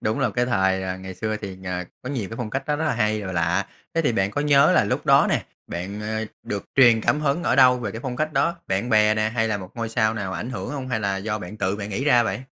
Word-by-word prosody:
Đúng 110 +1 -1
là - - +1
cái 125 0 0
thời, 95 -5 +1
à, 95 0 -3
ngày 95 0 -8
xưa 110 +3 -2
thì, 100 -3 -7
ờ, 90 -1 -3 0.2
có 125 - -6
nhiều 120 -9 -3
cái 115 - -6
phong 115 -3 -4
cách 135 +5 -2
nó 150 - 0
rất 160 - -2
là 155 - +1
hay 105 -2 0
và 95 -2 -5
lạ. 85 +3 +1 0.3
Thế 165 - +2
thì 145 - +2
bạn 95 -2 +1
có 145 - -2
nhớ 150 +3 +5
là 125 - +4
lúc 100 - -2
đó - - +6
nè, - - +1 0.2
bạn, 95 +5 -5
ờ, 110 +1 -2 0.2
được 100 -1 -4
truyền 120 -4 +6
cảm 150 +6 +1
hứng 150 +3 0
ở 130 - +1
đâu 125 -1 +6
về 110 -4 -3
cái 115 - -6
phong 125 -1 -4
cách 155 +3 -1
đó? 170 +2 +1
Bạn 95 +6 -1
bè 105 -1 +5
nè 110 0 +1
hay 115 -1 0
là 105 - 0
một 95 -1 -9
ngôi 115 -1 -3
sao 110 -1 +1
nào 100 -4 -3
ảnh 120 - -4
hưởng 125 - -5
hông? 135 -3 -5
Hay 110 -4 -1
là 100 -2 -1
do 105 +2 -3
bạn 100 +2 -8
tự 95 -1 -1
bạn 105 -1 -5
nghĩ 115 +7 -2
ra 125 -5 +5
vậy? 110 +2 -3
110 Hz, 300 wpm, -23 LUFS, 100-125 Hz, 0.3 s, đó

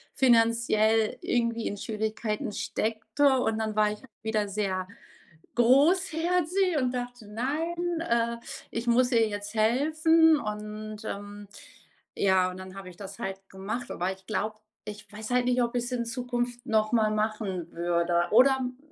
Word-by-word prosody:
finanziell 230 -2 +3
irgendwie 235 -1 0
in 205 - -4
Schwierigkeiten 215 0 -3
steckte 230 +7 0
und 225 -3 0
dann 220 -1 -2
war 210 -1 +3
ich 210 - -7 0.2
wieder 215 -2 0
sehr 190 -2 -2 0.7
großherzig 340 +6 +3
und 255 -2 0
dachte, 245 -3 -5
„Nein, 325 +10 -2
äh, 235 -6 0 0.3
ich 230 +1 -4
muss 245 +2 +3
ihr 230 -2 +4
jetzt 205 0 -6
helfen.“ 315 +8 +4
Und, 215 0 -6
ähm, 205 0 -7 0.7
ja, 190 -2 +3
und 180 - -9
dann 185 0 -9
habe 195 -2 -8
ich 175 - -14
das 195 -1 -9
halt 195 0 -5
gemacht, 205 +6 -5
aber 180 +2 -1
ich 190 0 -19
glaube, 215 0 -2 0.3
ich 210 -1 -9
weiß 215 +1 -7
halt 250 0 +2
nicht, 250 0 +2
ob 235 +1 -2
ich's 245 +1 -1
in 240 -2 -1
Zukunft 245 0 -3
noch 215 -1 +1
mal 215 -2 +3
machen 210 -5 -2
würde. 170 0 +1
Oder 265 +4 +6
m 250 -1 -4
225 Hz, 150 wpm, -28 LUFS, 210-250 Hz, 0.7 s, Oder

